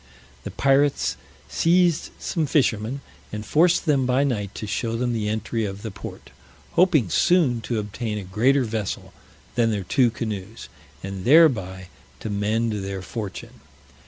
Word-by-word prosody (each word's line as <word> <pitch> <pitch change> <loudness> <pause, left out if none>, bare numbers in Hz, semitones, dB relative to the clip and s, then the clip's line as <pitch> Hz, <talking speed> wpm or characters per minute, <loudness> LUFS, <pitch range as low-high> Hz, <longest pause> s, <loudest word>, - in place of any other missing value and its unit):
The - - -3
pirates 140 +1 +2 0.3
seized 170 -1 +2
some 160 -4 -2
fishermen, 125 -2 +1 0.3
and 105 0 -5
forced 170 +7 +3
them 140 -5 +2
by 130 +2 +3
night 105 -8 -2
to 110 - -5
show 115 +3 -2
them 120 +1 -1
the 105 -2 -1
entry 110 +1 -2
of 100 -1 -5
the 110 - -5
port, 100 - -10 0.4
hoping 160 - +3
soon 135 - +3
to 115 +1 -3
obtain 105 +1 -3
a 105 - -5
greater 125 +9 +2
vessel 110 -3 -4 0.4
than 120 -1 +2
their 105 -3 -1
two 125 +6 +3
canoes, 110 -2 -6 0.3
and 95 -1 -5
thereby 95 - +4 0.3
to 110 - -4
mend 110 +3 0
their 95 -1 -5
fortune. 105 -1 -7
115 Hz, 150 wpm, -23 LUFS, 105-135 Hz, 0.4 s, thereby